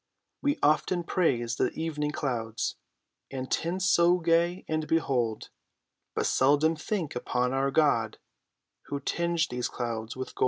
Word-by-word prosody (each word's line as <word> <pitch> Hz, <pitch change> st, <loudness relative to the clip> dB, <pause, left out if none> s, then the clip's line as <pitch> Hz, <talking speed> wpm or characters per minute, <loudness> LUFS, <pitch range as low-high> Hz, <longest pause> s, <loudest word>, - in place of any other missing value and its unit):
We 285 Hz, 0 st, +1 dB
often 165 Hz, +4 st, +2 dB
praise 120 Hz, -10 st, 0 dB
the -, -, +2 dB
evening 150 Hz, -2 st, -2 dB
clouds, 120 Hz, -7 st, -2 dB, 0.5 s
And 130 Hz, -1 st, -5 dB
tints 180 Hz, +3 st, 0 dB
so 175 Hz, 0 st, +5 dB
gay 170 Hz, +1 st, +1 dB
and 155 Hz, -1 st, -1 dB
bold, 125 Hz, -9 st, 0 dB, 0.7 s
But -, -, 0 dB
seldom 145 Hz, +5 st, +3 dB
think 165 Hz, +1 st, -3 dB
upon 125 Hz, +1 st, 0 dB
our 135 Hz, +1 st, +1 dB
God, 135 Hz, -7 st, +2 dB, 0.7 s
Who 140 Hz, -, -3 dB
tinged 170 Hz, +3 st, 0 dB
these 125 Hz, 0 st, -1 dB
clouds 115 Hz, -2 st, -4 dB
with 130 Hz, -, -5 dB
gold. -, -, -16 dB
150 Hz, 135 wpm, -28 LUFS, 125-170 Hz, 0.7 s, so